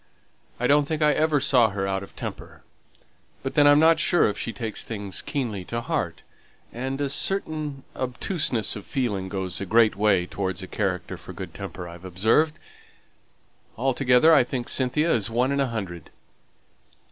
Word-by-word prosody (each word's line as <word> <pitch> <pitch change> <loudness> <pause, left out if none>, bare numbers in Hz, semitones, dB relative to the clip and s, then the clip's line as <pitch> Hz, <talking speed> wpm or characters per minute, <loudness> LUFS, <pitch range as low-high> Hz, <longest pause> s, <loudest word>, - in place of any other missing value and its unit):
I 125 - -1
don't 145 +2 +4
think 155 +1 -1
I 150 0 +5
ever 155 -2 +2
saw 125 -4 +4
her 95 -1 -3
out 95 0 -1
of 100 - -12
temper; - - -8 0.8
but 135 - -3
then 145 -1 +5
I'm 145 0 +7
not 160 +2 +5
sure 175 - +4
if 105 - -2
she 115 - -4
takes 110 0 -5
things 100 -4 -4
keenly 115 -10 -3
to 115 - -3
heart, 120 - -3 0.5
and 130 +3 -4
a 145 - 0
certain 155 -3 -1
obtuseness 130 - -1
of 105 - -9
feeling 105 -9 -2
goes 95 -2 -3
a - - -2
great 110 +1 +4
way 100 -3 +2
towards 95 0 -4
a - - -7
character 95 -3 -3
for - - -10
good - - -8
temper, 90 - -7
I've 85 +1 -11
observed. 110 - +2 1.2
Altogether 130 +4 +4
I 140 - +6
think 120 0 -4
Cynthia 145 +6 +1
is 110 0 +1
one 125 +4 +1
in 140 - 0
a 135 - +2
hundred." 95 -8 -6
120 Hz, 170 wpm, -25 LUFS, 100-140 Hz, 1.2 s, I'm